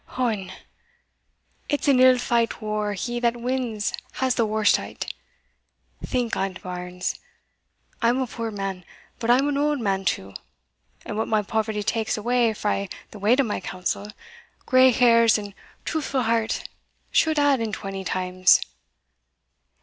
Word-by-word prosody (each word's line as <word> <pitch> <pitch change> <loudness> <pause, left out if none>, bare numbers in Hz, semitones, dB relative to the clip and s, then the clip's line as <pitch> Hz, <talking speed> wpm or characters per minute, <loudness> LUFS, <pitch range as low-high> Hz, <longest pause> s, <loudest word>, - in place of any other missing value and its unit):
Ohon! 215 -7 -1 1.2
it's 290 0 -1
an 270 -3 +5
ill 255 0 +7
feight 235 -2 +1
whar 210 -1 -2
he 240 +5 -3
that 240 0 +1
wins 240 -4 -2 0.2
has 260 -1 +1
the 230 -3 +1
warst 215 -1 +3
o't. - - -6 1.0
Think 245 -3 -1
on't, 190 -1 -3
bairns. 180 0 -4 0.8
I'm 240 +2 +3
a 260 - +1
puir 230 -1 -5
man 195 -3 -4 0.4
but 230 - -3
I'm 260 +4 +4
an 285 -1 0
auld 295 0 +1
man 195 -4 0
too 100 - -2 0.7
and - - -5
what 220 - 0
my 215 -1 +1
poverty 215 0 -1
takes 220 +1 -1
awa 235 0 +1
frae 200 -2 -1 0.2
the 210 - -10
weight 220 +7 +3
o' - - +1
my 215 -5 -2
counsel, 185 +2 -3 0.6
grey 255 0 +6
hairs 230 -2 +5
and 205 -1 -6
a - - -17 0.3
truthfu' 280 -4 -1
heart 225 -1 0 0.4
should 315 -1 +3
add 285 -2 +4
it 225 -1 -2
twenty 195 -1 -5
times. 185 0 +3
225 Hz, 150 wpm, -24 LUFS, 200-250 Hz, 1.2 s, ill